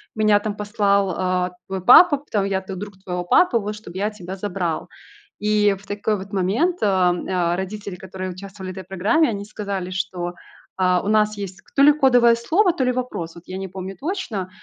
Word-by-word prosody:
меня, 215 -1 +4
там, 205 0 -4
послал, 205 -1 +1
а, 180 -1 0 0.2
твой 190 -1 -4
папа, 290 - +8
потом 220 -8 -2
я 195 -1 -1
тут 190 -1 -7
друг 205 0 -7
твоего 180 -1 -3
папы, 250 - +4
вот 210 0 -4
чтоб 210 -5 -11
я 200 +3 0
тебя 190 -2 -8
забрал". 180 -4 -3 0.5
И 210 -1 +2
в 195 - -17
такой 205 +1 -1
вот 195 +1 -9
момент, 215 - +1
а 190 -3 +3 0.4
а, - - 0
родители, 200 +1 -5
которые 185 0 -6
участвовали 190 +1 -9
в 185 - -11
этой 190 - -7
программе, 205 - +2
они 200 -2 -4
сказали, 200 -3 -4
что, 180 -2 -3 0.5
а, 180 -1 +3
у - - -5
нас 215 0 +2
есть 195 -2 -7
то 275 - +4
ли 295 - +9
кодовое 245 -5 +5
слово, 350 - +2
то 280 - -1
ли 250 - +2
вопрос. 245 -10 -4
Вот 170 - -12
я 185 - -6
не 190 0 -4
помню 190 +1 -7
точно. 275 - -3
200 Hz, 200 wpm, -22 LUFS, 185-215 Hz, 0.5 s, ли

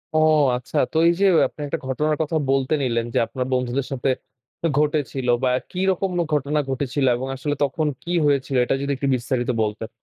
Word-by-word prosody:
ও - - +4 0.4
আচ্ছা, 125 - -6
তো 160 - -2
এই 170 - +5
যে 200 - +4 0.2
আপনি - - -12
একটা - - -3
ঘটনার 150 +4 0
কথা 160 +1 -2
বলতে 135 +1 +1
নিলেন, 115 -2 0
যে - - +1
আপনার 130 -1 -3
বন্ধুদের 125 +1 -1
সাথে 135 0 -1 0.7
ঘটেছিল 145 -4 0 0.2
বা 130 - +3 0.2
কিরকম 190 +1 0 0.2
ঘটনা 150 +1 +1
ঘটেছিল? 135 +1 -1
এবং 130 +2 -4
আসলে 145 +2 -2
তখন 150 +3 0 0.2
কি 170 - -5
হয়েছিল 140 -2 +1
এটা 135 - +1
যদি 140 - -1
একটু 140 - -2
বিস্তারিত 125 0 -2
বলতেন? 110 +1 -2
135 Hz, 180 wpm, -22 LUFS, 125-150 Hz, 0.7 s, এই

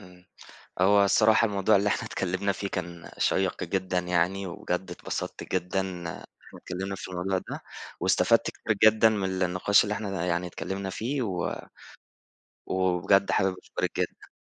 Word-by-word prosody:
امم. 90 -2 -16 0.6
هو 100 +2 +5
الصراحة 110 +3 +4
الموضوع 100 0 +3
اللي 100 +1 +2
إحنا - - 0
اتكلّمنا 95 +2 -1
فيه 100 +1 -4
كان 85 -2 -6
شيّق 95 -1 +1
جدًا 95 -1 -1
يعني، 90 +2 0
وبجد 95 0 -3
اتبسطت - - -5
جدًا 90 +1 0
إن 90 -2 -5
إحنا 80 - -10
اتكلّمنا 95 +2 -5
في 95 - -7
الموضوع 90 +1 -1
ده - - -7 0.4
واستفدت - - +3
كتير 110 - -2 0.2
جدًا 110 +1 +5
من 95 -3 -1
النقاش 90 +3 +3
اللي 105 - -2
إحنا 95 -5 -3
يعني 85 0 0
اتكلّمنا 95 +3 -4
فيه 125 +8 -2
و 95 -6 -2 1.1
وبجد 95 +1 +2
حابب 95 -1 +2
أشكرِك - - -3
جدًا. - - -3
95 Hz, 150 wpm, -27 LUFS, 90-100 Hz, 1.1 s, هو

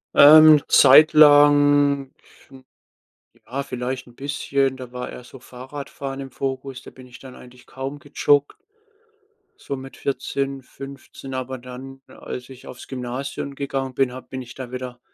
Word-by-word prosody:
Ähm, 155 +1 +9
'n 145 - -4
Zeit 155 0 +7
lang, 145 -2 +5 0.4
hm, 130 -1 -16 0.8
ja, 135 +3 -4
vielleicht 125 -1 -5
'n 120 - -18
bisschen, 140 -1 -2
da 125 -2 -10
war 125 0 -6
eher - - -10
so 130 +1 -14
Fahrradfahren 135 +2 -8
im 135 -1 -8
Fokus. 135 0 -5
Da - - -12
bin 130 -1 -15
ich 125 - -14
dann 130 -1 -13
eigentlich 125 0 -16
kaum 135 +2 -7
gejoggt, 145 0 0 1.0
so 140 - -6
mit 135 0 -11
14, 135 0 -3
15. 135 0 -11
Aber 130 0 -5
dann, 130 +2 -11
als 125 0 -9
ich 130 -1 -14
aufs 125 - -11
Gymnasium 130 +2 -6
gegangen 135 -1 -4
bin, 135 -1 0
habe 130 0 -11
bin 130 - -6
ich 125 0 -12
da 130 -2 -8
wieder 125 -1 -7
135 Hz, 160 wpm, -22 LUFS, 125-140 Hz, 1.0 s, Ähm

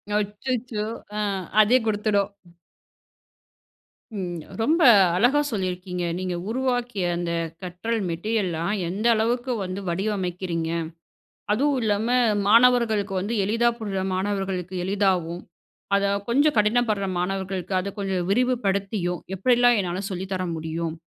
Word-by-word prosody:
அச்சச்சோ! 215 +2 -2 0.3
அ, - - -3 0.4
அதே 230 +4 +5
குடுத்துடும். 205 -2 +1 1.9
ம். 175 -4 -4 0.2
ரொம்ப 320 +8 +2 0.3
அழகா 245 +10 +4
சொல்லியிருக்கீங்க. 180 -3 -3 0.2
"நீங்க 185 -1 -2
உருவாக்கிய 245 -5 -1
அந்த 175 0 -2 0.3
கற்றல் 185 +6 -3
மெட்டீரியல்லாம், 175 -1 -1 0.2
எந்த 205 +6 -1
அளவுக்கு 240 +3 0
வந்து 185 +1 -4
வடிவமைக்கிறீங்க? 180 -3 -2 0.8
அதுவும் 275 +4 +1
இல்லாம 210 +1 +1 0.4
மாணவர்களுக்கு 225 -3 +4
வந்து 205 +5 -3
எளிதா 230 +4 +2
புரிற 200 -3 -3
மாணவர்களுக்கு 190 -2 -2
எளிதாவும், 185 -4 0 0.5
அத 200 0 +2 0.2
கொஞ்சம் 285 +4 +3
கடினப்படுற 210 -2 +2
மாணவர்களுக்கு 190 0 -3
அத 200 +2 -5
கொஞ்சம் 190 -3 -1
விரிவுபடுத்தியும், 200 -6 0 0.2
எப்படியெல்லாம் 245 +2 +4
என்னால 180 0 -3
சொல்லி 185 +1 -4
தர 185 -1 -2
முடியும்? 160 0 -4
200 Hz, 105 wpm, -24 LUFS, 185-230 Hz, 1.9 s, அதே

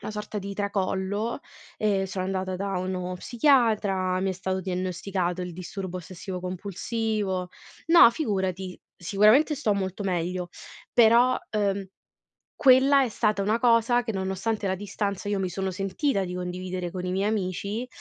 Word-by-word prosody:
una 215 - -6
sorta 210 0 -5
di 200 0 -6
tracollo 200 +3 -2 0.4
e 200 -3 +1
sono 185 0 -3
andata 185 0 -2
da 195 0 -2
uno 185 0 -3
psichiatra, 210 -7 +2
mi 195 - 0
è - - -1
stato 190 0 -3
diagnosticato 185 0 -2
il 180 - -5
disturbo 185 +1 -6
ossessivo 185 +1 -7
compulsivo 190 +1 -2 0.4
no 335 -7 +8
figurati, 190 - -2 0.2
sicuramente 215 - +4
sto 220 -7 +1
molto 195 0 -3
meglio, 180 -1 -2 0.4
però, 240 +2 +5
ehm, 200 -2 0 0.7
quella 270 +1 +5
è 255 - 0
stata 210 -1 0
una 215 +4 +1
cosa 240 0 +3
che 225 - -3
nonostante 195 +2 -2
la 190 - 0
distanza 205 0 -3
io 205 - 0
mi 190 - 0
sono 190 +2 -3
sentita 195 - -1
di 180 0 -5
condividere 180 0 -4
con 180 0 -5
i 180 - -2
miei 195 +3 +1
amici 205 +3 -2
195 Hz, 150 wpm, -26 LUFS, 185-215 Hz, 0.7 s, no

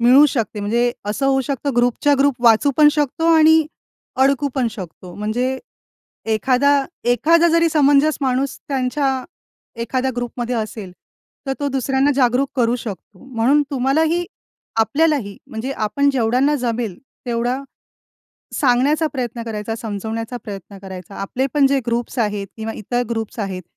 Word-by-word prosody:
मिळू 255 +5 +7
शकते. 225 -5 -2
म्हणजे 235 +4 +1
असं 215 +7 -1
होऊ 270 0 +3
शकतं 275 0 -3
ग्रुपच्या 245 +4 +3
ग्रुप 280 0 +3
वाचू 230 +5 +5
पण 300 -1 +7
शकतो 315 +3 +1
आणि 315 0 +5 0.6
अडकू 280 +1 +2
पण 250 -4 +1
शकतो. 180 -4 -9
म्हणजे 245 +5 -2 0.8
एखादा 270 +5 +3 0.3
एखादा 330 +7 +4
जरी 335 0 +4
समंजस 290 0 +3
माणूस 265 0 0
त्यांच्या 265 0 0 0.6
एखाद्या 260 +2 -1
ग्रुपमध्ये 245 0 -3
असेल, 215 -3 -5 0.6
तर 270 - 0
तो 285 - -1
दुसऱ्यांना 270 +1 +1
जागरूक 260 +1 +2
करू 240 -1 +2
शकतो. 210 -3 -8
म्हणून 265 +3 +2
तुम्हाला 270 +3 +2
ही 350 +2 0 0.5
आपल्याला 310 +7 +3
ही 200 -2 -9
म्हणजे 230 +4 -5
आपण 275 +4 0
जेवढ्यांना 260 +3 +2
जमेल 230 -5 -2 0.3
तेवढा, 240 +1 -1 1.0
सांगण्याचा 280 +4 +2
प्रयत्न 240 -3 -4
करायचा, 220 0 -4
समजवण्याचा 225 +2 -4
प्रयत्न 200 -1 -8
करायचा. 190 -1 -9
आपले 250 +7 -2
पण 285 -2 +4
जे 275 0 +2
ग्रुप्स 235 +2 -2
आहेत 210 -3 -1
किंवा 220 0 -4
इतर 245 +4 -2
ग्रुप्स 225 -1 -4
आहेत, 190 -3 -4
250 Hz, 140 wpm, -20 LUFS, 225-280 Hz, 1.0 s, मिळू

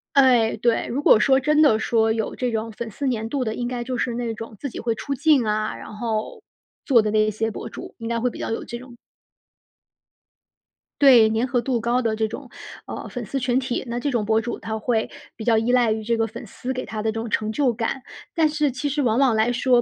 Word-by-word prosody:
哎， 250 -5 +5
对。 230 +1 +1
如 275 +5 -3
果 215 - +7
说 265 +4 +4
真 300 +3 +3
的 275 -8 +5
说 225 0 +2
有 220 -1 -3
这 250 -1 0
种 225 0 -3
粉 230 +1 -6
丝 270 +6 -2
粘 225 -3 -2
度 265 +3 -1
的， 220 -2 -2
应 240 +1 -3
该 245 -1 -3
就 255 +1 -3
是 240 0 -1
那 235 -1 -2
种 225 0 -8
自 280 - -5
己 - - -8
会 230 -1 -1
出 280 - -4
镜 285 -1 +3
啊， 215 0 -1
然 - - -10
后 225 - -3 0.4
做 245 -5 +5
的 210 -1 -1
那 215 0 +3
些 220 +1 -2
博 - - -6
主， - - -9
应 230 - -6
该 235 0 -1
会 245 +2 +1
比 - - -10
较 - - -3
有 225 - -3
这 235 - -7
种 250 -1 -13 2.1
对， 245 -6 +7
粘 225 +2 +1
合 245 -1 +1
度 245 0 0
高 240 +2 +1
的 225 -2 0
这 220 0 0
种， 220 - -8 0.4
呃， - - -6
粉 245 -3 -5
丝 275 - -3
群 250 0 +1
体， 260 -2 -2
那 235 +1 -3
这 285 - -1
种 230 -4 0
博 220 +1 +3
主 235 +2 -4
他 220 0 -4
会 225 0 0 0.3
比 225 - -7
较 225 0 +3
依 225 +2 +1
赖 240 -3 +4
于 220 0 -2
这 230 +2 +1
个 225 0 +1
粉 230 +2 -8
丝 250 +5 -5
给 255 -1 -3
他 215 +1 -5
的 220 0 0
这 225 - -4
种 230 +1 -4
成 215 0 0
就 255 0 +1
感。 235 +4 -2 0.3
但 325 -2 +3
是 300 -2 0
其 260 +4 -3
实 290 +1 0
往 240 -2 +2
往 260 -5 +4
来 220 +2 +2
说， 245 0 +3
235 Hz, 270 characters per minute, -23 LUFS, 220-255 Hz, 2.1 s, 果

